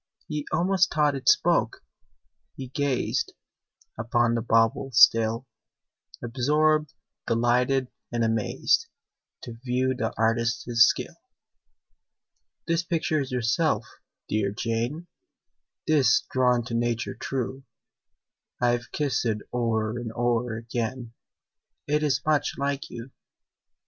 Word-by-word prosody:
He 150 -2 -4
almost 185 +3 +2
thought 150 -2 +2
it 135 -2 +1
spoke: - - +2 0.7
he 130 -2 -7
gazed 140 -1 -1 0.7
Upon 120 +1 +1
the 115 - 0
bauble 115 +3 +2
still, 115 +2 +5 0.8
Absorbed, 150 +5 +1 0.4
delighted, 125 +3 +1 0.2
and 120 -1 0
amazed, 110 -2 +1 0.6
To 115 -1 -9
view 130 +1 0
the 120 -3 -2
artist's 115 +1 0 0.2
skill. - - -2 1.5
"This 165 +1 +1
picture 165 -2 -1
is 135 - -5
yourself, 125 0 +1 0.4
dear 105 -2 0
Jane 115 +9 -3 0.8
'Tis 150 -4 +3
drawn 125 -3 +2
to 120 - -6
nature 120 0 -1
true: 130 0 -4 0.9
I've 120 -1 0
kissed 145 -3 -1
it 110 -3 -1
o'er 115 -1 -1
and 120 -2 -5
o'er 120 -1 0
again, 115 +1 -4 0.7
It 150 +1 +1
is 140 -2 0
much 155 -2 +1
like 140 0 -2
you." 120 +2 -9
125 Hz, 110 wpm, -26 LUFS, 115-140 Hz, 1.5 s, still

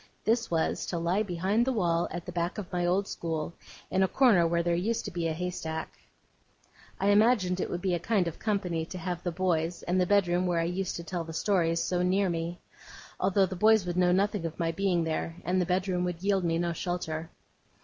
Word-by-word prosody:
This 230 +1 +2
was, 165 -1 0
to 175 - -2
lie 170 +5 +1
behind 195 +3 +1
the 265 - +1
wall 175 -7 +1
at 175 +1 -6
the - - -6
back 175 +2 -2
of 195 -3 -7
my 175 -1 +1
old 195 +3 +1
school, 160 -1 -3 0.4
in 190 - +2
a 190 - +4
corner 190 -6 +4
where 170 0 +1
there 170 0 +1
used 210 +7 -1
to 205 - -4
be 170 -2 -1
a - - -1
haystack. 160 -2 -4 1.0
I 195 - +2
imagined 205 -3 +3
it - - -2
would 175 - -4
be 185 -2 +1
a 175 - 0
kind 195 -1 +1
of 170 - -5
company 185 -6 -1
to 180 +3 -7
have 175 0 -4
the 175 - -2
boys, 170 -1 -1
and 180 +1 +1
the 180 - +1
bedroom 185 -2 +2
where 175 -1 +1
I - - +1
used 180 +2 -2
to 170 - -5
tell 170 +1 -3
the 165 0 -8
stories, 165 -2 +1
so 180 -1 0
near 185 +1 +2
me: 170 +1 -3 0.6
although 190 +1 +3
the 185 0 -5
boys 215 +1 +4
would 175 -1 -3
know 180 0 +3
nothing 200 0 +1
of 165 -1 -4
my 165 -1 0
being 180 -1 +1
there, 165 +1 -2
and 185 +1 +1
the 175 - -1
bedroom 185 0 0
would 175 0 -4
yield 195 -2 +2
me 165 -1 +1
no 170 0 0
shelter. 165 -2 -3
180 Hz, 230 wpm, -29 LUFS, 170-190 Hz, 1.0 s, a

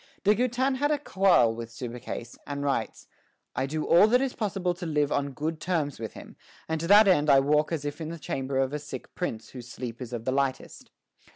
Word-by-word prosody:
De 205 +1 +5
Goutin 255 +4 0
had 290 +2 +1
a 300 - +2
quarrel 190 - +3
with 115 0 -7
Subercase, 120 0 -7
and 140 0 -4
writes: 140 -1 -2 0.5
"I 130 - 0
do 155 +2 -3
all 175 +5 +6
that 245 +3 +4
is 270 -1 -1
possible 195 -4 -1
to 175 0 -7
live 150 -2 +1
on 140 -1 -1
good 155 +3 -3
terms 155 -8 -1
with 110 -1 -5
him, - - -12 0.3
and 160 0 -2
to 165 - -2
that 205 +2 +7
end 150 -5 +4
I 135 - +7
walk 150 +3 +2
as 155 -3 -2
if 145 +3 -4
in 160 - -4
the 170 - -6
chamber 135 -3 -3
of 135 +1 +1
a 150 - -2
sick 145 -3 -9
prince 115 -12 -4
whose 125 -2 -10
sleep 120 -1 -7
is 125 -2 -6
of 115 -2 -5
the 130 - +1
lightest." 135 -1 -2
150 Hz, 225 wpm, -27 LUFS, 130-185 Hz, 0.5 s, that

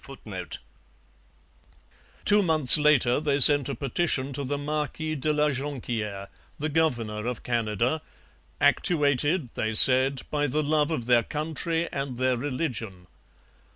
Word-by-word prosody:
] - - -24 2.2
Two 210 0 +4
months 155 -8 +7
later 150 -5 +2
they 145 -2 -1
sent 145 0 +7
a 140 - -4
petition 140 +1 -2
to 140 - -5
the 145 +2 -4
Marquis 150 +2 -4
de 155 +1 -2
la 150 0 0
Jonquiere, 120 -8 -5 0.3
the 155 +2 -4
governor 120 -9 -2
of 125 -3 -6
Canada, 120 +5 -2 0.6
actuated, 145 -1 +1
they 110 0 -3
said, 130 +3 +5
by 145 -1 -1
the 150 +3 -2
love 150 0 0
of 140 -8 -4
their 120 -1 +3
country 160 +4 -4
and 135 -3 -5
their 130 0 0
religion. 120 - -5
140 Hz, 130 wpm, -25 LUFS, 125-150 Hz, 2.2 s, months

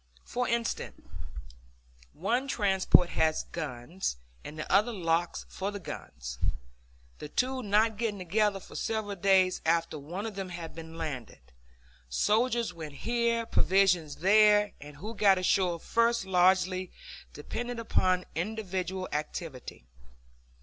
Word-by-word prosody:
For 250 0 -2
instance, 235 0 -2 1.1
one 235 - 0
transport 190 -6 +4
had 160 -1 +2 0.2
guns, 150 - -4 0.3
and 155 - -8
another 200 +9 +2
the 220 - -7
locks 170 0 0
for 195 +1 -4
the 205 - -5
guns; 60 - -8 0.8
the 150 - -7
two 255 - 0
not 215 0 +2
getting 220 -2 -1
together 200 +2 +1
for - - -14
several 220 -2 -2
days 185 0 +3
after 165 -1 +1
one 175 +9 -5
of 220 - -4
them 195 -1 -5
had 170 -2 -7
been 165 0 -9
landed. 130 - -6 0.6
Soldiers 225 - +1
went 160 -3 -8
here, 235 +4 0
provisions 180 -8 +2
there; 210 +3 +5
and 145 0 -10
who 210 +9 -6
got 200 -3 +4
ashore 180 -1 +2
first 230 +2 +1
largely 185 0 +3 0.4
depended 240 +11 -5
upon 185 -5 +1
individual 190 0 -3
activity. 150 - -5
190 Hz, 125 wpm, -29 LUFS, 165-215 Hz, 1.1 s, there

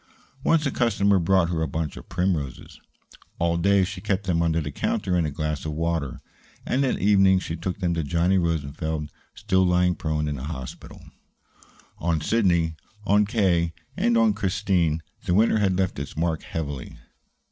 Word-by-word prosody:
Once 160 -2 +3
a 140 - +1
customer 100 -5 +2
brought 85 0 +3
her 80 -2 -1
a 80 - 0
bunch 75 0 -3
of - - -11
primroses. 85 -7 -2 0.6
All 85 0 +1
day 100 +3 +3
she 95 0 -5
kept 95 +1 -1
them 90 -3 +1
under 85 -1 +1
the 75 -2 -4
counter 90 +6 -1
in 85 -3 +2
a - - -2
glass 75 0 -3
of 80 - -3
water, 80 -3 -2 0.4
and 135 +2 +1
at 130 - +1
evening 95 -2 +4
she 85 -3 -3
took 90 +2 -4
them 90 -3 0
to 85 - -1
Johnny 85 +5 +2
Rosenfeld, 80 -2 -2 0.2
still 95 0 +1
lying 90 0 +3
prone 80 -2 -2
in 75 -1 -3
the 65 - -6
hospital. 65 -5 -8 1.0
On 85 0 0
Sidney, 85 -5 +2 0.3
on 105 0 +3
K., 90 -7 +1 0.2
and 120 -1 +2
on 115 -2 +4
Christine 90 -5 0 0.2
the 90 - +1
winter 110 +1 +4
had 95 -3 +1
left 95 -6 -1
its 70 +1 -7
mark 80 -1 0
heavily. 70 -5 -5
85 Hz, 175 wpm, -25 LUFS, 80-95 Hz, 1.0 s, evening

